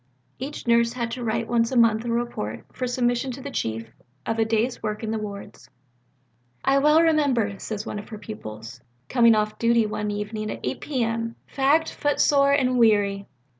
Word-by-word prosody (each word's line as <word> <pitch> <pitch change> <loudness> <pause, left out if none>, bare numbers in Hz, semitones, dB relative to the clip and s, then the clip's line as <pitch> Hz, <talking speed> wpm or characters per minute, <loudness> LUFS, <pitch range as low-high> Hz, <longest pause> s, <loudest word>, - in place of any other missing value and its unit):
Each 275 +4 -6
nurse 235 0 +3
had 235 -2 -3
to 245 +1 -5
write 230 0 -1
once 230 0 +1
a 260 - 0
month 225 -1 +4
a 235 - -1
report, 235 - -3
for 255 - -3
submission 245 +1 0
to 270 - -8
the 280 - -6
Chief, 115 - -3 0.3
of 225 0 -2
a 225 - +3
day's 225 +3 0
work 215 +1 -3
in 220 - -2
the 220 - -1
wards. 200 -1 -8 1.0
"I 275 +1 +4
well 300 +3 +5
remember," 265 - +2
says 215 -1 -5
one 210 - -4
of 205 - -11
her 215 - -7
pupils, 125 - -9 0.3
"coming 235 -3 +5
off 215 0 -1
duty 230 -1 +3
one 210 0 -3
evening 210 +1 -4
at - - -5
8 125 - -3
P.M. 230 -4 -2
fagged, 290 +4 +2
footsore, 285 -1 +3
and 255 -3 +2
weary. 205 -3 +3
230 Hz, 185 wpm, -24 LUFS, 210-255 Hz, 1.0 s, well